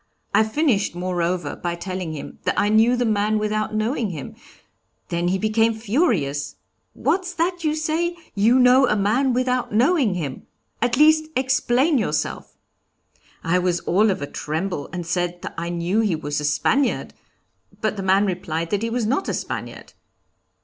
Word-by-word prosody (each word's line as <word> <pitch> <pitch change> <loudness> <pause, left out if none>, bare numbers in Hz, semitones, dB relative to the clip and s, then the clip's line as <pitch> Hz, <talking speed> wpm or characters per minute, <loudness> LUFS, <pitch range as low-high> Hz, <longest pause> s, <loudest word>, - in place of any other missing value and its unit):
I - - +5
finished, 220 - +1
moreover, 175 -3 -2
by 175 -1 -3
telling 180 -2 -5
him 150 - -8
that - - +1
I 205 - +2
knew 225 +3 +4
the 245 0 0
man 215 0 +1
without 215 0 -1
knowing 220 +1 0
him; 155 -7 -7 0.8
then 170 +1 -1
he 185 +2 +1
became 225 +2 +2
furious: 215 - 0 0.4
'What's 365 -1 -1
that 350 +1 -1
you 305 -1 +1
say? 325 +3 -1 0.2
You 225 +5 +4
know 255 +1 +6
a 210 - +2
man 220 +7 +2
without 250 0 0
knowing 245 - +3
him! 145 -7 -5 0.3
At 240 +1 +1
least 310 +1 +5
explain 260 +2 +2
yourself!' 155 -8 -3 0.9
I 180 +2 +2
was 180 -1 0
all 210 +5 +2
of 185 -7 -1
a - - -1
tremble, 160 +2 -4
and 180 -2 -5
said 175 0 -2
that - - -6
I 170 +1 -4
knew 175 +4 0
he 210 -6 +2
was 145 -2 -3
a - - -3
Spaniard, 265 - +1 0.7
but 215 0 -1
the 195 - -4
man 190 +2 +3
replied 170 -3 -3
that 205 -1 0
he 230 - -1
was 235 -1 -1
not 270 - 0
a - - -1
Spaniard. - - -6
215 Hz, 170 wpm, -22 LUFS, 175-250 Hz, 0.9 s, know